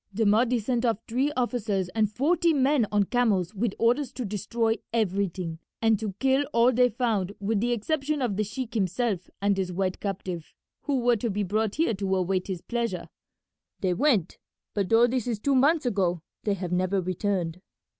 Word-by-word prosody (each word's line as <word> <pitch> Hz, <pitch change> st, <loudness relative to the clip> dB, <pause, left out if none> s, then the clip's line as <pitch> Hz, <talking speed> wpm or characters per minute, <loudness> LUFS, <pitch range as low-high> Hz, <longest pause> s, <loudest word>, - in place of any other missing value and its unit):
The 220 Hz, +3 st, 0 dB
Mahdi 230 Hz, +4 st, +3 dB
sent 235 Hz, +2 st, -1 dB
off 230 Hz, -4 st, +2 dB
three 260 Hz, +5 st, +1 dB
officers 220 Hz, -7 st, 0 dB
and 215 Hz, +2 st, 0 dB
forty 325 Hz, +8 st, +2 dB
men 270 Hz, -4 st, +3 dB
on 205 Hz, -1 st, +3 dB
camels 205 Hz, -5 st, +1 dB
with 215 Hz, 0 st, -1 dB
orders 245 Hz, +3 st, +2 dB
to 250 Hz, -, -4 dB
destroy 225 Hz, +3 st, -1 dB
everything, 190 Hz, -6 st, -1 dB, 0.2 s
and 225 Hz, -2 st, +3 dB
to 215 Hz, -3 st, -3 dB
kill 270 Hz, +3 st, +2 dB
all 235 Hz, +2 st, +5 dB
they 250 Hz, 0 st, +4 dB
found 215 Hz, -5 st, -1 dB
with 205 Hz, +1 st, 0 dB
the 240 Hz, +3 st, 0 dB
exception 290 Hz, +6 st, -1 dB
of 240 Hz, -7 st, 0 dB
the 215 Hz, -, +1 dB
sheik 225 Hz, +3 st, -5 dB
himself 195 Hz, -2 st, -1 dB
and 200 Hz, 0 st, +3 dB
his 190 Hz, -2 st, -2 dB
white 185 Hz, +1 st, -1 dB
captive, 185 Hz, -4 st, -5 dB, 0.3 s
who 275 Hz, -3 st, +1 dB
were 240 Hz, -1 st, +3 dB
to 230 Hz, +3 st, -2 dB
be 205 Hz, 0 st, -1 dB
brought 210 Hz, +2 st, -1 dB
here 315 Hz, -6 st, +2 dB
to 190 Hz, -1 st, -1 dB
await 185 Hz, 0 st, 0 dB
his 185 Hz, -4 st, -4 dB
pleasure. 235 Hz, -6 st, -3 dB, 0.7 s
They 185 Hz, -2 st, +1 dB
went, 205 Hz, -, +1 dB, 0.3 s
but 200 Hz, -3 st, -1 dB
though 230 Hz, +1 st, +6 dB
this 245 Hz, -1 st, -1 dB
is 235 Hz, -3 st, -1 dB
two 275 Hz, +7 st, 0 dB
months 285 Hz, +4 st, +3 dB
ago 180 Hz, -7 st, 0 dB, 0.2 s
they 205 Hz, -2 st, +1 dB
have 180 Hz, -2 st, -5 dB
never 185 Hz, +2 st, +1 dB
returned. 185 Hz, -1 st, -2 dB
215 Hz, 185 wpm, -27 LUFS, 190-245 Hz, 0.7 s, though